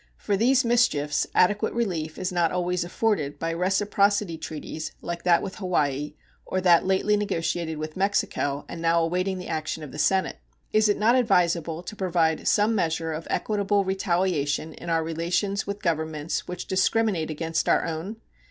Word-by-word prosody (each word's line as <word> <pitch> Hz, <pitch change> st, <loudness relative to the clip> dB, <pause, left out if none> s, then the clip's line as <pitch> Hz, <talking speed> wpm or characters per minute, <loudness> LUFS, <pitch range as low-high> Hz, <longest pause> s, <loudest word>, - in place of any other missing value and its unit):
For 205 Hz, -, -1 dB
these 250 Hz, +5 st, +3 dB
mischiefs 150 Hz, -12 st, +2 dB
adequate 205 Hz, +5 st, +2 dB
relief 170 Hz, -9 st, -2 dB
is 185 Hz, 0 st, -2 dB
not 175 Hz, -2 st, +1 dB
always 180 Hz, 0 st, 0 dB
afforded 175 Hz, -5 st, -1 dB
by 165 Hz, -, -2 dB
reciprocity 200 Hz, +1 st, +1 dB
treaties 155 Hz, 0 st, -6 dB
like 170 Hz, 0 st, -5 dB
that 175 Hz, -1 st, +4 dB
with 195 Hz, -, -6 dB
Hawaii 150 Hz, -6 st, -1 dB, 0.3 s
or 185 Hz, -, -2 dB
that 180 Hz, -1 st, +4 dB
lately 190 Hz, +2 st, +2 dB
negotiated 165 Hz, -5 st, -2 dB
with 155 Hz, 0 st, -5 dB
Mexico 190 Hz, -7 st, 0 dB
and 165 Hz, -, -7 dB
now 165 Hz, 0 st, +3 dB
awaiting 185 Hz, +3 st, -1 dB
the 180 Hz, -, -7 dB
action 155 Hz, 0 st, -3 dB
of 145 Hz, -, -8 dB
the 150 Hz, -, -8 dB
Senate. 190 Hz, -, +1 dB, 0.4 s
Is 215 Hz, 0 st, +4 dB
it 205 Hz, -, +2 dB
not 220 Hz, +3 st, +4 dB
advisable 175 Hz, -8 st, +2 dB
to 215 Hz, -, -7 dB
provide 170 Hz, -5 st, 0 dB
some 210 Hz, +2 st, +3 dB
measure 165 Hz, -4 st, -1 dB
of 160 Hz, +1 st, -6 dB
equitable 205 Hz, -1 st, 0 dB
retaliation 175 Hz, -5 st, 0 dB
in 170 Hz, -, -8 dB
our 165 Hz, -1 st, +1 dB
relations 175 Hz, +5 st, -1 dB
with 200 Hz, +1 st, -5 dB
governments 160 Hz, -2 st, -2 dB
which 180 Hz, 0 st, -5 dB
discriminate 190 Hz, -3 st, +1 dB
against 160 Hz, +1 st, -2 dB
our -, -, +3 dB
own? 165 Hz, +6 st, -4 dB
175 Hz, 165 wpm, -25 LUFS, 160-200 Hz, 0.4 s, that